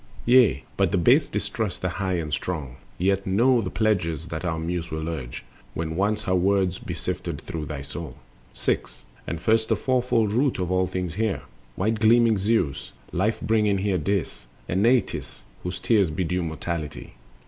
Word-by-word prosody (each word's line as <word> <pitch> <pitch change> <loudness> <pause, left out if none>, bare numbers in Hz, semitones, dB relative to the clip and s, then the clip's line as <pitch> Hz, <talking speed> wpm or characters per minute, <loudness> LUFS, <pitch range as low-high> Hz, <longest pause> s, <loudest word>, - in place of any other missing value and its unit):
Yea, 120 - +5
but - - +2
the - - +2
base - - +4
distrust 105 -6 -3
the 90 - +1
High 95 0 -2
and 80 -3 -3
Strong; 75 -8 -3 0.2
Yet 95 +2 +1
know 120 +6 +4
the 95 - -3
pledges 85 -8 0
that 80 0 -4
our 85 -3 -1
Muse 85 +1 -3
will 80 0 -3
urge, 65 -8 -5 0.3
When 80 0 -3
once 105 +4 +1
her 95 - 0
words 95 -1 +2
be - - -5
sifted - - -4
through 80 -2 -5
thy 75 -3 -5
soul. 70 0 -7 0.4
The - - -15
Elements. - - -9
6. - - -1 0.2
And 85 - -3
first 110 +4 +2
the 110 - +4
fourfold 120 -2 +1
root 130 +3 +2
of 90 -1 -2
all 95 0 +2
things 90 -2 -3
hear!— 100 -7 -1 0.3
White 110 +3 0
gleaming 115 -1 +5
Zeus, 95 -10 0 0.2
life 105 +6 0
bringing 105 -2 +2
Here, 95 -1 0
Dis, 90 -7 -2 0.2
And 95 +2 0
Nestis 120 +3 +1 0.2
whose 90 0 -4
tears 105 -7 +3
bedew 90 +3 -1
mortality. 80 -1 -4
95 Hz, 180 wpm, -25 LUFS, 80-110 Hz, 0.4 s, Yea